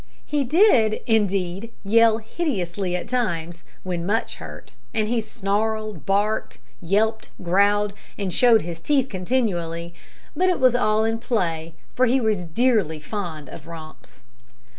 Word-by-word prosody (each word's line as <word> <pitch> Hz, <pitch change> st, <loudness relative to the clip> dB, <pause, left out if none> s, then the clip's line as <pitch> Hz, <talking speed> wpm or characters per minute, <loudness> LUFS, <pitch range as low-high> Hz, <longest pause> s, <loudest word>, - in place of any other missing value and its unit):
He 295 Hz, -2 st, 0 dB
did, 255 Hz, -, +4 dB
indeed, 200 Hz, -1 st, 0 dB
yell 225 Hz, +2 st, +4 dB
hideously 200 Hz, -, -2 dB
at 180 Hz, -, -4 dB
times, 175 Hz, -9 st, -2 dB, 0.2 s
when 175 Hz, -2 st, -3 dB
much 210 Hz, +5 st, -1 dB
hurt, -, -, -10 dB, 0.2 s
and 215 Hz, -1 st, +1 dB
he 235 Hz, 0 st, 0 dB
snarled, 215 Hz, +1 st, -2 dB
barked, 205 Hz, +2 st, 0 dB, 0.2 s
yelped, 215 Hz, +5 st, 0 dB
growled, 200 Hz, +3 st, +2 dB, 0.2 s
and 195 Hz, -4 st, -2 dB
showed 235 Hz, -3 st, +5 dB
his 170 Hz, 0 st, -6 dB
teeth 270 Hz, -, +1 dB
continually, 175 Hz, -5 st, -2 dB, 0.4 s
but 370 Hz, +1 st, +2 dB
it 360 Hz, -, +1 dB
was 255 Hz, -2 st, +5 dB
all 215 Hz, -3 st, +2 dB
in 225 Hz, 0 st, 0 dB
play, 165 Hz, -9 st, -2 dB, 0.2 s
for 255 Hz, +1 st, +3 dB
he 260 Hz, +3 st, +3 dB
was 215 Hz, -6 st, 0 dB
dearly 195 Hz, -4 st, +1 dB
fond 160 Hz, -3 st, -5 dB
of 150 Hz, +3 st, -11 dB
romps. 155 Hz, -6 st, -12 dB
205 Hz, 140 wpm, -23 LUFS, 175-230 Hz, 0.4 s, showed